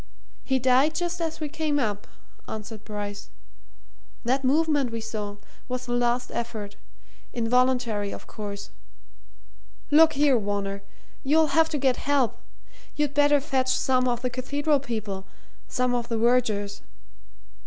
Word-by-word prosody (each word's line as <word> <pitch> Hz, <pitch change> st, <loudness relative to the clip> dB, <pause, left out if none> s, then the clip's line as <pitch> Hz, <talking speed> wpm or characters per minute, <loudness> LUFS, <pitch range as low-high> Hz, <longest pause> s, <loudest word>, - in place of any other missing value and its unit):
"He 265 Hz, -, +1 dB
died 260 Hz, +5 st, +3 dB
just 350 Hz, 0 st, -2 dB
as 325 Hz, -1 st, -2 dB
we 305 Hz, -, -2 dB
came 305 Hz, -1 st, -1 dB
up," 210 Hz, -6 st, -1 dB, 0.4 s
answered 215 Hz, 0 st, -7 dB
Bryce. 205 Hz, -1 st, -6 dB, 0.9 s
"That 260 Hz, +3 st, +1 dB
movement 290 Hz, -1 st, +2 dB
we 230 Hz, -, -3 dB
saw 210 Hz, -2 st, -5 dB, 0.3 s
was 250 Hz, 0 st, -3 dB
the 240 Hz, -, -3 dB
last 245 Hz, 0 st, +1 dB
effort 220 Hz, -4 st, -4 dB, 0.6 s
involuntary, 235 Hz, -3 st, +1 dB
of -, -, -8 dB
course. 205 Hz, -1 st, -7 dB, 1.2 s
Look 315 Hz, +1 st, +7 dB
here, 280 Hz, -3 st, +4 dB
Varner! 200 Hz, -1 st, -2 dB, 0.4 s
you'll 305 Hz, +2 st, +3 dB
have 325 Hz, 0 st, +4 dB
to 300 Hz, -, -1 dB
get 265 Hz, -3 st, +2 dB
help. 275 Hz, -6 st, +1 dB, 0.6 s
You'd 295 Hz, -2 st, 0 dB
better 290 Hz, 0 st, +5 dB
fetch 265 Hz, -2 st, 0 dB
some 255 Hz, -1 st, +2 dB
of 240 Hz, 0 st, -1 dB
the 250 Hz, -, 0 dB
cathedral 285 Hz, +4 st, 0 dB
people 215 Hz, -7 st, -4 dB, 0.4 s
some 250 Hz, 0 st, 0 dB
of 240 Hz, -1 st, -1 dB
the 230 Hz, -, -1 dB
vergers. 220 Hz, -4 st, +1 dB
250 Hz, 135 wpm, -26 LUFS, 220-285 Hz, 1.2 s, Look